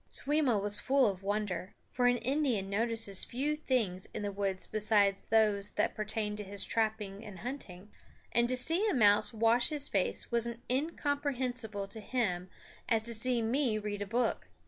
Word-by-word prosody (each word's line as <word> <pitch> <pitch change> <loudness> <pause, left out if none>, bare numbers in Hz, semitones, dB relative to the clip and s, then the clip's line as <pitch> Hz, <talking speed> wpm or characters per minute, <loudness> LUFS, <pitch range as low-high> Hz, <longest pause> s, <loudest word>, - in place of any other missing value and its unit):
Simmo 285 -5 +1
was 205 +1 0
full 270 0 +3
of 195 -4 -1
wonder, 200 -2 -3 0.2
for 245 -1 +2
an 245 0 +3
Indian 245 -6 -1
notices 225 -2 +2
few 285 +5 -1
things 230 - -1
in 210 - -3
the 205 - -2
woods 195 -1 -2
beside 210 -2 +2
those 210 -2 +2
that - - 0
pertain 215 0 -2
to 210 - -5
his 200 0 +2
trapping 215 -2 -2
and 205 -4 -9
hunting; 210 -4 -7 0.4
and 235 0 +2
to 255 - +4
see 335 - +3
a 390 - 0
mouse 205 -3 +4
wash 230 +2 +2
his 295 -2 -2
face 195 -3 -1
was 235 0 +2
as 235 0 -5
incomprehensible 260 -7 -2
to 220 - -8
him 200 -6 -2 0.4
as 225 -2 +2
to 235 +1 -1
see 235 +1 +2
me 240 -1 +1
read 205 -1 -4
a 205 - -3
book. 235 +2 -1
220 Hz, 175 wpm, -32 LUFS, 205-250 Hz, 0.4 s, to